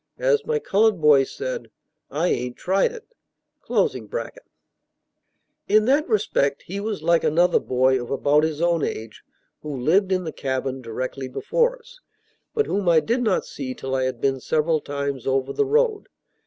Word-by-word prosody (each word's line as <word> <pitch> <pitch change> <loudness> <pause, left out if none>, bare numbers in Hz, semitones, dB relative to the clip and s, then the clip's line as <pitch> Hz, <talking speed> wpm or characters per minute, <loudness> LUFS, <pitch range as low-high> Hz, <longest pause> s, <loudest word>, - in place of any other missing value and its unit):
As 480 -3 +1
my 465 -1 +1
colored 215 - +2
boy 150 -3 +5
said, - - -5 0.4
"I 165 +5 0
ain't 125 0 -2
tried 195 - +1
it."] 475 0 -12 2.5
In 215 +1 +4
that 280 +4 +2
respect 195 -10 +1
he 195 +3 -5
was 205 -5 -4
like 170 0 +3
another 175 +4 +3
boy 130 0 +2
of 120 - -8
about 145 +2 +2
his 160 0 -1
own 170 -2 +2
age, 110 -1 -5 0.4
who 150 -3 -5
lived 185 +9 +2
in 185 -1 +1
the 160 - -4
cabin 130 -1 -3
directly 130 +3 -5
before 485 - 0
us, 485 +1 -18 0.6
but 440 -1 +2
whom 195 -3 0
I 165 -2 +6
did 235 +9 -1
not 215 -6 +1
see 130 -2 -6
till 135 0 -5
I 130 -1 +1
had 130 -2 -3
been 135 0 0
several 155 +3 0
times 140 -3 -4
over 135 0 0
the 425 - +1
road. 450 -1 +1
165 Hz, 165 wpm, -23 LUFS, 135-225 Hz, 2.5 s, I